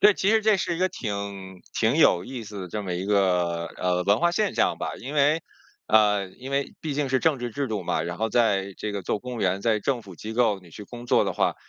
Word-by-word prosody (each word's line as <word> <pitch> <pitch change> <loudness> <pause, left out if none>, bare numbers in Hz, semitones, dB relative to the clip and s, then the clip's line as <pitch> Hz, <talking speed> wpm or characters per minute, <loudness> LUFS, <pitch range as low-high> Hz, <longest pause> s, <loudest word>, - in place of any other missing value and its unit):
对， 210 0 +7
其 195 +2 +1
实 220 0 +4
这 215 -1 +4
是 175 -2 -1
一 - - -5
个 185 - +2
挺 100 - -5 0.2
挺 115 +5 +2
有 90 - +5
意 130 -2 -6
思 100 -3 -7
的 90 - -7
这 105 +4 -4
么 90 -3 -3
一 90 +2 -3
个， 90 -4 +1
呃， 90 0 0
文 100 +3 +4
化 175 - +3
现 205 +2 0
象 - - +1
吧。 - - -3
因 135 +4 -7
为， 150 +2 +3 0.5
呃， 105 -2 +4
因 130 +7 -10
为 140 0 -1
毕 155 -3 -3
竟 145 -1 0
是 130 - +3
政 155 -2 +2
治 120 0 -4
制 140 +5 -2
度 105 -3 -2
嘛， - - -1
然 85 0 -4
后 110 +1 -1
在 100 -5 +2
这 105 - -3
个 100 -2 -4
做 105 - -1
公 125 +1 -7
务 115 - -5
员 95 0 +1
在 110 0 +2
政 125 +3 -1
府 95 -5 -12
机 110 +6 -6
构 110 -4 +2
你 90 -3 -17
去 105 +6 -9
工 120 +3 -10
作 120 - +3
的 - - -2
话， - - +1
110 Hz, 290 characters per minute, -25 LUFS, 95-135 Hz, 0.5 s, 对